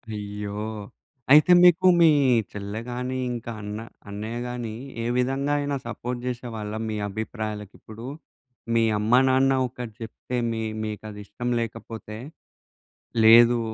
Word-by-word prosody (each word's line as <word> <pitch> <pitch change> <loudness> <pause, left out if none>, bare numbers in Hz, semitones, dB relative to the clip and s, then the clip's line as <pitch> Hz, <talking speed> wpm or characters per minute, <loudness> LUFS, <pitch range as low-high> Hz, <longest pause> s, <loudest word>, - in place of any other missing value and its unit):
అయ్యో! 105 0 -5 0.7
అయితే, 150 +4 +7
మీకు, 180 +1 +6
మీ 165 - +8 0.4
చెల్లె 105 +2 -5
గానీ 125 +1 -3
ఇంకా 120 -1 -5
అన్న 105 +1 -5 0.3
అన్నయ్య 110 +3 -5
గానీ, 120 -3 -5 0.3
ఏ - - -3
విధంగా 135 +3 0
అయినా 145 0 -1
సపోర్ట్ 120 +1 -4
చేసేవాళ్ళా 115 -4 -5
మీ 110 - -2
అభిప్రాయాలకిప్పుడూ? 110 +1 -6 0.7
మీ 115 - +4 0.2
అమ్మ, 105 +2 -1 0.2
నాన్న 130 +1 +4 0.2
ఒకటి 120 -3 -8
చెప్తే, 115 +2 -5
మీ 110 0 -2 0.2
మీకది 105 -1 -6
ఇష్టం 120 +5 -5
లేకపోతే, 115 -1 -6 1.1
లేదు 120 +1 +8
115 Hz, 120 wpm, -25 LUFS, 105-125 Hz, 1.1 s, మీ